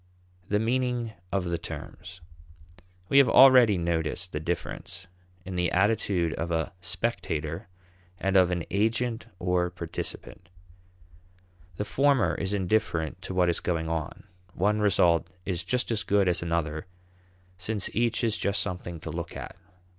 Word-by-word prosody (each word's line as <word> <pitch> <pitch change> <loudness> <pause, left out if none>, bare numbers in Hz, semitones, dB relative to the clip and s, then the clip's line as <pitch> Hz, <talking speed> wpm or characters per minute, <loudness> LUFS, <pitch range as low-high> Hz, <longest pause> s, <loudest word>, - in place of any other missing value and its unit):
The 105 - +2
Meaning 120 0 0 0.2
of 95 0 0
the 85 -1 -2
Terms. 85 +3 -8 0.9
We 140 - +6
have 135 -4 +6
already 125 -7 +7
noticed 85 +1 -1
the 75 - -3
difference 85 +3 -4 0.4
in 95 0 -5
the 90 0 +1
attitude 95 -4 +2
of 85 +3 -3
a 80 -1 -1
spectator 85 -4 -2 0.5
and 95 +1 -1
of 90 -2 +6
an 90 -2 -1
agent 115 +3 0
or 90 -1 +1
participant. 85 0 -6 1.3
The 105 - -3
former 135 0 +3
is 95 - -3
indifferent 95 -5 0
to 95 - -5
what 90 -1 +3
is 85 - +1
going 80 -2 -2
on; 80 -2 -4 0.3
one 105 +4 +2
result 85 -5 +3 0.2
is 90 -3 -2
just 125 -1 0
as 110 -2 0
good 100 -1 +2
as 90 - +2
another, 85 0 -2 0.7
since 100 +2 -2
each 120 +1 +1
is 110 -2 +1
just 100 0 +1
something 90 -3 -4
to 80 - -6
look 85 +1 -5
at. - - -8
90 Hz, 145 wpm, -27 LUFS, 85-110 Hz, 1.3 s, already